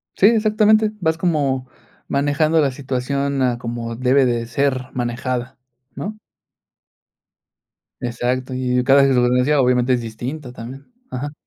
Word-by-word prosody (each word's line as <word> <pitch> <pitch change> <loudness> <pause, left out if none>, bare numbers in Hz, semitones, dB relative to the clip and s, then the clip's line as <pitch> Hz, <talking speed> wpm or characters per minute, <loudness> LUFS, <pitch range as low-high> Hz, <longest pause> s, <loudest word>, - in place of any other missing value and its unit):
Sí, 195 - +5
exactamente, 215 -1 +3
vas 160 -1 +1
como 140 -7 0 0.4
manejando 150 +3 +2
la 140 - +1
situación 140 +1 -2
a 125 -2 +1
como 115 -1 -5
debe 130 +3 +3
de 120 -1 -1
ser 130 +1 -1
manejada, 125 +1 -3 0.4
¿no? 215 +2 -5 1.8
Exacto, 125 +2 -2
y 125 -1 0
cada 135 +2 +5
circunstancia 125 +2 +3
obviamente 125 0 +2
es 120 - 0
distinta 125 +5 -6
también. 130 - -10 0.2
Ajá. 145 +3 -5
130 Hz, 120 wpm, -20 LUFS, 125-145 Hz, 1.8 s, Sí